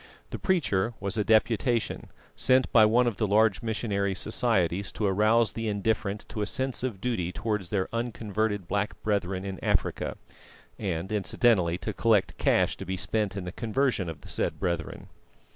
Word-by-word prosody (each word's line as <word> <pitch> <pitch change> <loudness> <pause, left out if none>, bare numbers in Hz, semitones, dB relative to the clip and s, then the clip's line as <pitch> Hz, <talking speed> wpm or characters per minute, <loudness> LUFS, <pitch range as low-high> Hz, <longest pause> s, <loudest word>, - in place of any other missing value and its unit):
The - - -5
preacher 120 - +1
was 100 +2 -3
a 105 - +1
"Deputation," 110 +2 +1 0.3
sent 130 0 +3
by 110 -2 +7
one 120 +4 +4
of 115 -5 -1
the 110 - +1
large 105 0 +3
missionary 105 -4 -1
societies 95 -4 0
to 105 - -2
arouse 105 +2 +3
the 115 -1 -3
indifferent 105 0 -1
to 105 - -4
a 105 - 0
sense 130 +1 -2
of 120 -6 -3
duty 95 -7 -1
towards 105 -3 -3
their 95 -1 0
unconverted 110 -4 -2
black 100 +2 -2
brethren 100 -3 -1
in 95 -3 -6
Africa, - - 0 0.6
and 95 -2 -3
incidentally 100 -3 +2
to 110 - -4
collect 110 -1 +2
cash - - +2
to - - -6
be 95 0 -2
spent 105 +1 -1
in 95 - -3
the 90 - -4
conversion 115 -4 0
of 75 -3 -8
the - - -13
said - - -2
brethren. 85 -3 -3
105 Hz, 170 wpm, -27 LUFS, 95-115 Hz, 0.6 s, by